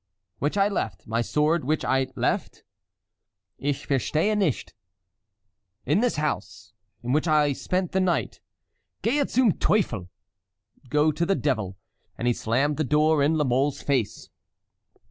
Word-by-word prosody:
"—which 145 +7 -1
I 195 0 +4
left—my 115 - -2
sword 150 +6 +1
which 155 +4 0
I 130 0 +1
left"— - - -2 1.0
"Ich 145 0 -2
verstehe 155 - +1
nicht." 190 - -1 1.1
"—in 150 +8 +2
this 245 +1 +1
house, 150 0 -4 0.3
in 120 - -2
which 150 +5 +1
I 150 -2 +3
spent 180 +5 -2
the 190 - +1
night." 185 -2 0 0.6
"Gehe 280 +4 +1
zum 250 -4 +4
Teufel!" 120 - +1 0.8
(Go 150 +2 +3
to 155 +3 -2
the 195 +3 +2
devil!) 110 - -1 0.4
And 120 - -2
he 120 - +4
slammed 135 +7 0
the 155 - +1
door 150 +1 +3
in 150 +3 +3
La 150 - +2
Mole's 135 +2 0
face. 130 -7 -1
150 Hz, 140 wpm, -25 LUFS, 130-170 Hz, 1.1 s, I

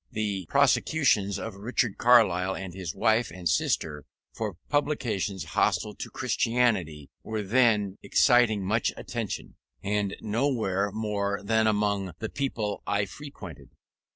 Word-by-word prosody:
The 100 -5 -2
prosecutions 105 - +2
of 115 - -5
Richard 110 +2 -2
Carlile 95 -6 +4
and 95 -2 -6
his 90 -4 -6
wife 115 +1 +2
and 90 -1 -5
sister 75 -2 0 0.3
for 105 -5 -4
publications 125 -10 -1
hostile - - 0
to - - -7
Christianity 100 - 0
were 110 -1 -4
then 105 -3 +2
exciting 120 -6 +3
much 110 +4 +1
attention, - - -5 0.3
and 100 -1 -1
nowhere 110 -4 0
more 100 -1 -2
than 110 +1 +2
among 100 -3 0
the 110 - -4
people 115 -7 -3
I 100 0 +1
frequented. 95 - -10
105 Hz, 125 wpm, -27 LUFS, 95-115 Hz, 0.3 s, Carlile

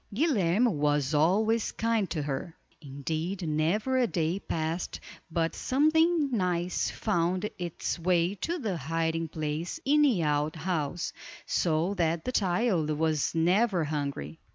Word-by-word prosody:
Guilerme 220 - +2
was 145 - +1
always 210 +9 +2
kind 225 -4 0
to 155 -3 -2
her; 145 +4 -4 0.2
indeed 160 +6 -4
never 175 +12 +1
a 245 - +3
day 170 -1 -1
passed 165 -1 -3 0.3
but 165 0 0
something 310 +2 +2
nice 180 -5 0
found 180 +4 0
its 175 0 -3
way 175 +1 +2
to 330 - -3
the 215 - -2
hiding 165 +2 -1
place 155 - -4
in 295 +2 +4
the 245 - +3
out 150 +1 0
house, 165 -1 -2 0.3
so 170 +3 +1
that 165 -3 0
the 255 - -1
child 185 -5 +1
was 155 0 0
never 180 +3 +3
hungry. 140 - -4
170 Hz, 130 wpm, -28 LUFS, 155-210 Hz, 0.3 s, in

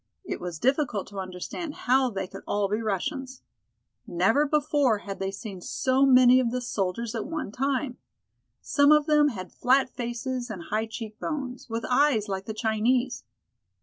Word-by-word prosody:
It - - -4
was 175 -2 -5
difficult 260 - +1
to 200 -1 -7
understand 190 - -6
how 260 +1 +4
they 195 -4 -3
could 195 +1 -10
all 205 -1 +1
be 210 +3 -1
Russians. 260 - -3 0.6
Never 225 +12 +2
before 290 -5 +2
had 195 -1 -6
they 195 0 -1
seen 195 -1 -7
so 265 +7 +2
many 255 -1 +7
of 250 -2 +1
the 250 +2 -2
soldiers 225 -1 -2
at 225 - -3
one 310 -10 -4
time. 265 +1 -1 0.6
Some 285 0 +4
of 300 -1 +5
them 300 -1 +4
had 185 -9 -5
flat 260 +1 +2
faces 245 +1 -4
and 190 -6 -6
high 220 +1 0
cheek 220 -1 -8
bones, 265 -6 -5
with 230 +1 -3
eyes 250 -5 +3
like 195 -1 -3
the 220 - -4
Chinese. 225 +4 0
240 Hz, 170 wpm, -27 LUFS, 205-270 Hz, 0.6 s, many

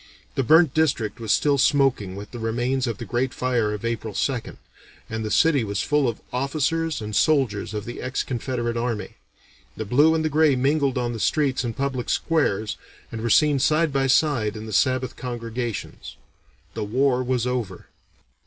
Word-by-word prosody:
"The - - 0
burnt 160 +3 +5
district 125 -9 0
was 110 -2 -2
still 145 -2 +3
smoking 135 -9 +2
with 100 +1 -9
the 120 - -7
remains 120 +3 -1
of 115 -4 -3
the - - -7
great 125 +2 -1
fire 120 -4 0
of 105 +1 -5
April 115 -3 -3
2nd, 130 -5 -2 0.5
and 110 0 -3
the 110 - -3
city 145 +4 +3
was 100 -1 -2
full 150 -2 +2
of 115 - -4
officers 155 +3 -1
and 105 0 -5
soldiers 115 -6 +1
of 105 0 -4
the 120 - -7
ex 130 0 -2
Confederate 120 -2 -3
army. 115 -5 -3 0.6
The 110 - -4
blue 145 +9 +4
and 160 -1 0
the - - +1
gray 155 -1 +3
mingled 135 +1 +1
on 120 -1 -1
the 115 - -5
streets 140 +1 +1
and 115 -2 -4
public 135 -3 -2
squares, 110 -10 0 0.3
and 115 - -5
were 115 - -1
seen 145 +5 +4
side 155 +2 +2
by 135 -1 +1
side 125 -7 +2
in 110 - -7
the 110 - -7
Sabbath 130 +3 +1
congregations. 120 -2 -5 0.6
The - - -3
war 130 +4 +1
was 125 -1 -1
over." 120 -7 -3
125 Hz, 180 wpm, -23 LUFS, 110-140 Hz, 0.6 s, burnt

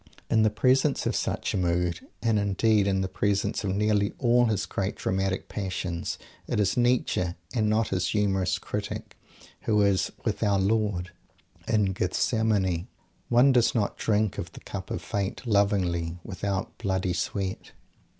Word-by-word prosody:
In 110 - +4
the 110 - +5
presence 130 +6 +2
of - - 0
such - - -1
a - - 0
mood, 90 -1 0 0.2
and, 115 -2 +3
indeed, 100 +1 +2
in 95 -1 +1
the 95 - 0
presence 100 +2 0
of 95 -1 -1
nearly 105 -1 +2
all 120 -1 +4
his 105 -4 0
great - - -2
dramatic 95 0 -1
Passions, 90 -4 -3 0.3
it - - -1
is 100 -1 +2
Nietzsche, 120 -8 +1 0.2
and 110 -4 +1
not 110 +1 +2
his 95 -1 0
humorous 95 -3 +1
critic, - - -5 0.5
who 105 -1 +3
is 100 -2 +2
"with - - -1
Our 100 -1 +3
Lord" 100 -2 0 0.6
in 105 -4 +2
Gethsemane. 95 -1 +1 0.4
One 125 +3 +6
does 125 -2 +3
not 105 -3 0
drink 105 -2 0
of - - -6
the - - -11
cup - - -7
of - - -4
Fate 100 +5 -3
"lovingly" 95 -6 +1
without 95 0 -4
bloody 95 -4 0
sweat! 95 +2 -3
100 Hz, 155 wpm, -27 LUFS, 95-110 Hz, 0.6 s, One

